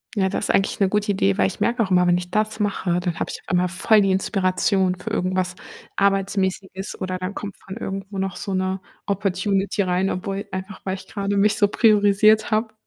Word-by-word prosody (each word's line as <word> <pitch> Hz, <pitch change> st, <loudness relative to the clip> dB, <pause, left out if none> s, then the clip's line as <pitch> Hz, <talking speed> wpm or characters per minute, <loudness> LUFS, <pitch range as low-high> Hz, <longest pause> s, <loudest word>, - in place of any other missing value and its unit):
Ja, 190 Hz, -2 st, +2 dB
du 195 Hz, -, -2 dB
hast -, -, -3 dB
eigentlich 195 Hz, +3 st, +1 dB
'ne 195 Hz, -2 st, +3 dB
gute 210 Hz, 0 st, +1 dB
Idee, 100 Hz, -, +1 dB
weil 95 Hz, -, +3 dB
ich 95 Hz, -, -3 dB
merke 235 Hz, -1 st, +1 dB
auch 195 Hz, -, -4 dB
immer, 180 Hz, -1 st, +4 dB
wenn 175 Hz, 0 st, +4 dB
ich 180 Hz, 0 st, -6 dB
das 215 Hz, +1 st, 0 dB
mache, 190 Hz, -4 st, 0 dB
dann 175 Hz, -2 st, -3 dB
habe -, -, -2 dB
ich -, -, -6 dB
immer 180 Hz, 0 st, +2 dB
voll 210 Hz, +4 st, +3 dB
die 195 Hz, -, +2 dB
Inspiration 190 Hz, -1 st, +1 dB
für 180 Hz, -, -7 dB
irgendwas 185 Hz, 0 st, 0 dB, 0.4 s
Arbeitsmäßiges 195 Hz, -1 st, -1 dB
oder 185 Hz, 0 st, -3 dB
dann 185 Hz, +2 st, -4 dB
kommt 205 Hz, -2 st, -6 dB
von 195 Hz, +3 st, -9 dB
irgendwo 195 Hz, -1 st, -5 dB
noch 190 Hz, -1 st, -2 dB
so 195 Hz, +1 st, -4 dB
'ne 185 Hz, +1 st, -1 dB, 0.3 s
Opportunity 200 Hz, +1 st, 0 dB
rein, 185 Hz, +1 st, +1 dB
obwohl 195 Hz, +2 st, -4 dB
einfach, 190 Hz, +1 st, -6 dB
weil 190 Hz, 0 st, -2 dB
ich 190 Hz, -, -11 dB
gerade 200 Hz, -1 st, -2 dB
mich 205 Hz, +1 st, +3 dB
so 205 Hz, -3 st, +4 dB
priorisiert 215 Hz, 0 st, +4 dB
habe. 220 Hz, 0 st, 0 dB
195 Hz, 210 wpm, -22 LUFS, 185-205 Hz, 0.4 s, immer